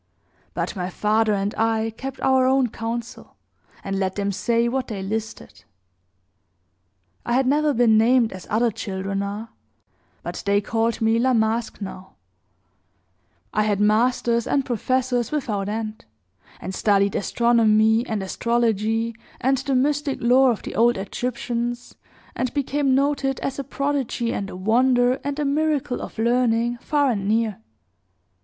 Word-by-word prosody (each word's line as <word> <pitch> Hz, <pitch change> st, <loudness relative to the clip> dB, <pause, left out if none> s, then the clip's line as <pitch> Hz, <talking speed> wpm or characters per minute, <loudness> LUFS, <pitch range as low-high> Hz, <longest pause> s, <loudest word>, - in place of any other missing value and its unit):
But -, -, -2 dB
my 180 Hz, -1 st, -3 dB
father 215 Hz, +3 st, +1 dB
and 200 Hz, +1 st, -1 dB
I 225 Hz, 0 st, +1 dB
kept 270 Hz, +2 st, -7 dB
our 260 Hz, -1 st, +3 dB
own 260 Hz, -1 st, +3 dB
council, 230 Hz, +2 st, -6 dB, 0.5 s
and 195 Hz, 0 st, -2 dB
let 190 Hz, -1 st, -1 dB
them 200 Hz, -1 st, -1 dB
say 230 Hz, +4 st, +1 dB
what 260 Hz, +1 st, -2 dB
they 200 Hz, -5 st, -5 dB
listed. 220 Hz, +2 st, -5 dB, 1.6 s
I 240 Hz, -, -2 dB
had 260 Hz, +2 st, +3 dB
never 295 Hz, +3 st, +2 dB
been 230 Hz, -4 st, +4 dB
named, 235 Hz, 0 st, +3 dB
as 185 Hz, -, -10 dB
other 230 Hz, +2 st, +2 dB
children 195 Hz, 0 st, -4 dB
are; 205 Hz, +3 st, -5 dB, 0.7 s
but -, -, -5 dB
they 200 Hz, 0 st, +2 dB
called 225 Hz, +2 st, -1 dB
me 225 Hz, +1 st, +3 dB
La 255 Hz, +1 st, +2 dB
Masque 225 Hz, +1 st, 0 dB
now. 190 Hz, -1 st, -8 dB, 1.4 s
I -, -, +2 dB
had 210 Hz, -2 st, +1 dB
masters 235 Hz, +2 st, +2 dB
and 275 Hz, -2 st, +1 dB
professors 250 Hz, 0 st, 0 dB
without 210 Hz, -9 st, -2 dB
end, 215 Hz, 0 st, -5 dB, 0.5 s
and 185 Hz, -, -6 dB
studied 200 Hz, 0 st, +2 dB
astronomy 220 Hz, 0 st, +3 dB
and 215 Hz, -3 st, -2 dB
astrology, 225 Hz, +1 st, 0 dB, 0.2 s
and 265 Hz, +1 st, +1 dB
the 270 Hz, 0 st, -1 dB
mystic 285 Hz, +1 st, +1 dB
lore 255 Hz, +2 st, +4 dB
of 230 Hz, -, -1 dB
the -, -, -6 dB
old 235 Hz, +2 st, +3 dB
Egyptians, 240 Hz, +3 st, -3 dB, 0.4 s
and 255 Hz, -1 st, -1 dB
became 280 Hz, -1 st, +1 dB
noted 275 Hz, -1 st, 0 dB
as 275 Hz, -, -3 dB
a -, -, -2 dB
prodigy 275 Hz, -3 st, -2 dB
and 195 Hz, -1 st, -3 dB
a -, -, -8 dB
wonder, 245 Hz, +5 st, +2 dB
and 285 Hz, 0 st, -3 dB
a 300 Hz, -, -1 dB
miracle 290 Hz, -2 st, 0 dB
of -, -, -8 dB
learning, 235 Hz, 0 st, +1 dB
far 285 Hz, -1 st, +1 dB
and 200 Hz, -4 st, -2 dB
near. 220 Hz, -1 st, 0 dB
235 Hz, 145 wpm, -23 LUFS, 215-255 Hz, 1.6 s, been